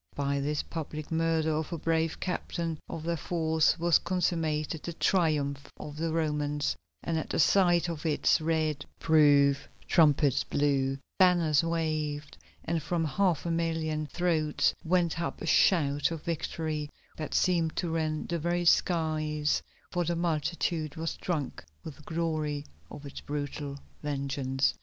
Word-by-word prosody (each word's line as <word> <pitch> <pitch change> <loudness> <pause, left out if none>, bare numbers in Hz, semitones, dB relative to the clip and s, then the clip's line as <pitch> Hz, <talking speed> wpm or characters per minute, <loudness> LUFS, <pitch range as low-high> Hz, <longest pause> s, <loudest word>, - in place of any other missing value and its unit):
By 140 0 0
this 145 +2 -1
public 155 -1 -6
murder 160 -1 +1
of 155 0 -2
a 170 - -2
brave 165 0 0
captain 170 -3 -3
of 160 - -5
their 170 +1 0
foes 160 -1 +1
was 170 -1 +4
consummated 165 -3 -1
the 170 - -5
Triumph 150 -6 +1
of 145 - -7
the 165 +1 -1
Romans, 150 -2 0 0.3
and 165 -1 0
at - - -6
the - - -1
sight 175 +1 +4
of 165 -3 -5
its 155 -1 +2
red 155 -2 0 0.2
proof 145 -3 +4 0.2
trumpets 145 -4 +4
blew, 135 -2 +1 0.2
banners 170 -5 +4
waved, 155 -3 -2 0.3
and 165 0 0
from 165 +2 -1
half 170 +2 +1
a 170 - 0
million 160 -2 -1
throats 160 -3 +1
went 170 -1 +1
up 170 - -3
a - - -5
shout 145 -4 +3
of 165 -2 -6
victory 155 -2 -3 0.3
that 155 - -4
seemed 170 -3 +2
to 175 - -1
rend 155 -1 -1
the 170 0 -1
very 175 +2 0
skies, 155 -3 +2 0.3
for 175 - 0
the 170 +1 -1
multitude 160 -1 -1
was 160 0 -3
drunk 155 - -3 0.2
with 155 - -8
the - - -15
glory 155 -2 -2 0.2
of 145 - -10
its 140 - -8
brutal 145 -1 -4 0.2
vengeance. 140 -2 0
155 Hz, 145 wpm, -29 LUFS, 150-165 Hz, 0.3 s, was